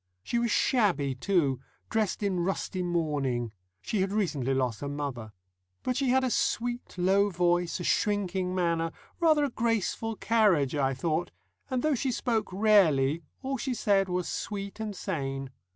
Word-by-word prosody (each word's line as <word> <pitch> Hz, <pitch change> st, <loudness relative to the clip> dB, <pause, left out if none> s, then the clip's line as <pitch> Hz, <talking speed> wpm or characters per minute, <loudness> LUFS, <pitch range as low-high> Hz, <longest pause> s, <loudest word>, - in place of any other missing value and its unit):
She 235 Hz, -, 0 dB
was 235 Hz, 0 st, +1 dB
shabby, 195 Hz, -, +2 dB
too, 140 Hz, -3 st, +1 dB, 0.3 s
dressed 215 Hz, -2 st, 0 dB
in 190 Hz, -3 st, 0 dB
rusty 185 Hz, +1 st, -2 dB
mourning 145 Hz, -9 st, -1 dB, 0.3 s
she 210 Hz, -, -1 dB
had 190 Hz, 0 st, 0 dB
recently 165 Hz, -, 0 dB
lost 125 Hz, -5 st, -1 dB
her 140 Hz, -, -3 dB
mother. 140 Hz, -6 st, -4 dB, 0.5 s
But 250 Hz, -, 0 dB
she 270 Hz, -1 st, +1 dB
had 260 Hz, +1 st, +3 dB
a 255 Hz, -, 0 dB
sweet, 240 Hz, -3 st, -1 dB
low 195 Hz, +3 st, +3 dB
voice, 175 Hz, -1 st, +1 dB
a -, -, -4 dB
shrinking 190 Hz, -2 st, 0 dB
manner, 170 Hz, -2 st, 0 dB, 0.3 s
rather 315 Hz, -3 st, +4 dB
a 285 Hz, -, 0 dB
graceful 225 Hz, -1 st, -1 dB
carriage, 200 Hz, -, +3 dB
I 135 Hz, -3 st, +1 dB
thought, 160 Hz, +5 st, -1 dB, 0.4 s
and, 255 Hz, -2 st, -1 dB
though 310 Hz, -1 st, +3 dB
she 265 Hz, 0 st, 0 dB
spoke 230 Hz, -3 st, -1 dB
rarely, 170 Hz, -8 st, +4 dB, 0.2 s
all 270 Hz, +1 st, -2 dB
she 255 Hz, +1 st, -2 dB
said 195 Hz, -4 st, +2 dB
was 180 Hz, 0 st, -1 dB
sweet 200 Hz, 0 st, -4 dB
and 215 Hz, -2 st, -4 dB
sane. 135 Hz, -4 st, -3 dB
185 Hz, 160 wpm, -29 LUFS, 150-225 Hz, 0.5 s, rather